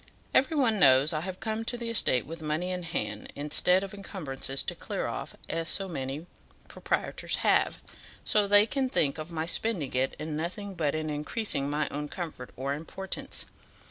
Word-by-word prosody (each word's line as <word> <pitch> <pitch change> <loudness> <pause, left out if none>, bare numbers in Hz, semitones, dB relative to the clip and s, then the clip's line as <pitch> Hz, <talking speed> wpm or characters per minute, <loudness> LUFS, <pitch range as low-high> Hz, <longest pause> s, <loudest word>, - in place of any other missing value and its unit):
Every 310 +4 +4
one 230 -7 +3
knows 135 +1 +6
I 155 - +1
have 185 +1 -5
come 220 0 -2
to 240 - 0
the 235 -1 -3
estate 130 - +3
with 165 +1 -7
money 155 +4 -1
in 180 0 -2
hand 170 -1 -3
instead 180 +6 +3
of 195 - -6
encumbrances 145 -9 -2
to - - -3
clear - - -3
off, - - -4
as 165 0 -1
so 195 - 0
many 140 -1 -4 0.4
proprietors - - -1
have, - - +3 0.5
so 210 -1 +3
they 205 +1 +7
can 265 +3 0
think 150 - +2
of 155 +2 -6
my 160 -1 -1
spending 175 - 0
it 130 +1 +1
in 155 0 -4
nothing 185 +6 -3
but 155 -4 0
in 155 -1 -1
increasing 150 -1 0
my 150 0 0
own 150 +1 -4
comfort 160 -8 -5
or 135 +2 -1
importance. 185 +6 -4
165 Hz, 180 wpm, -29 LUFS, 150-200 Hz, 0.5 s, they